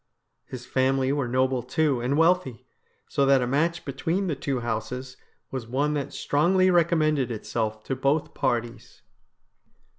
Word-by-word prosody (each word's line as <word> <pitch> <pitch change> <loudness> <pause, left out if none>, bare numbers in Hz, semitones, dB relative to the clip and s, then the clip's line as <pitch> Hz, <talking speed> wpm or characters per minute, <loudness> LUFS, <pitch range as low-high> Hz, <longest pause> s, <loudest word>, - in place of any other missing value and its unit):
His 125 -1 -8
family 130 +1 +1
were 140 -3 -1
noble, 130 +1 +1
too, 145 -1 0
and 130 +4 0
wealthy, 165 -7 +2 0.4
so 140 - 0
that 135 -2 +4
a - - 0
match 155 +7 0
between 165 +8 -1
the 165 -5 -1
two 135 -2 -3
houses 125 +3 -4 0.4
was 130 -4 -5
one 140 +5 0
that 145 -2 -3
strongly 185 +6 +2
recommended 155 -6 +2
itself 110 -1 -3
to 135 - -3
both 140 +4 0
parties. 120 -1 -3
135 Hz, 145 wpm, -25 LUFS, 125-155 Hz, 0.4 s, that